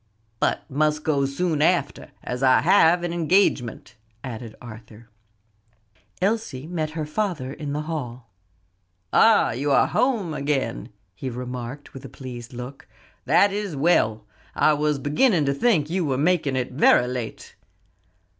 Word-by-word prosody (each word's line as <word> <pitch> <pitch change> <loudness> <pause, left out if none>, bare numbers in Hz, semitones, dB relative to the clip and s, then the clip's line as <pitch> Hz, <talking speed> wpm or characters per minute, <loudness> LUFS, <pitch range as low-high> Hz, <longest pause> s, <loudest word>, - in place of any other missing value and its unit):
"But - - 0
must 150 +2 0
go 140 -3 +1
soon 155 +2 -1
after, 160 -3 +1
as 125 +1 -4
I 130 -1 +5
have 175 0 +4
an 175 -1 -2
engagement," 165 - +1 0.3
added 115 -3 -7
Arthur. 115 -1 -13 1.1
Elsie 195 - -1
met 160 -2 -3
her 155 - -2
father 150 -6 -3
in 145 -2 -5
the 150 +1 -2
hall. 125 -8 -6 0.8
"Ah, 225 - +5
you 135 +6 -2
are - - +5
at - - -2
home 225 -11 0
again," 140 - -2 0.2
he 130 +7 -6
remarked 125 +2 -7
with 135 - -10
a 135 - -9
pleased 125 -2 -9
look; 125 +2 -9 0.4
"that 200 -1 +4
is 205 -5 -3
well; 110 -8 +2 0.3
I 155 - +4
was 150 0 0
beginning 150 - +2
to 140 - +1
think 160 - +2
you 185 0 0
were 135 -4 -1
making 150 -2 +1
it 130 -1 -2
very 125 -2 +4
late." 125 -2 -6
145 Hz, 145 wpm, -23 LUFS, 125-170 Hz, 1.1 s, I